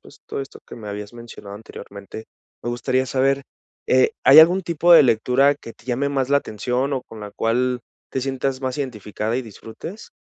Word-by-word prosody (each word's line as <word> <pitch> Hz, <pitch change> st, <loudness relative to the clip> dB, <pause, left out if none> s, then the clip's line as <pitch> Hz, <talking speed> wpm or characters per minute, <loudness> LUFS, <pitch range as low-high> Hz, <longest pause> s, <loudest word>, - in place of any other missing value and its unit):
pues -, -, -17 dB
todo -, -, -4 dB
esto 135 Hz, -, -9 dB
que -, -, -10 dB
me 105 Hz, -2 st, -8 dB
habías 105 Hz, +2 st, -6 dB
mencionado 115 Hz, -4 st, -10 dB
anteriormente, 100 Hz, -1 st, -10 dB, 0.4 s
me 120 Hz, -, -2 dB
gustaría 130 Hz, +2 st, 0 dB
saber, 135 Hz, +1 st, +1 dB, 0.4 s
eh, 130 Hz, 0 st, +4 dB
¿hay 140 Hz, +3 st, +9 dB
algún 175 Hz, +4 st, +7 dB
tipo 170 Hz, +1 st, +3 dB
de -, -, +9 dB
lectura 125 Hz, +3 st, +3 dB
que 115 Hz, -, -11 dB
te -, -, -23 dB
llame 130 Hz, +3 st, -1 dB
más 135 Hz, -2 st, -1 dB
la 140 Hz, -, +5 dB
atención 125 Hz, +4 st, -2 dB
o 130 Hz, -, -3 dB
con 110 Hz, -1 st, -12 dB
la 105 Hz, -1 st, -8 dB
cual 125 Hz, +2 st, 0 dB, 0.3 s
te 130 Hz, -, -2 dB
sientas 135 Hz, 0 st, -2 dB
más 130 Hz, +2 st, -2 dB
identificada 110 Hz, -3 st, -3 dB
y 130 Hz, -, -1 dB
disfrutes? 115 Hz, -, -10 dB
125 Hz, 195 wpm, -22 LUFS, 115-135 Hz, 0.4 s, hay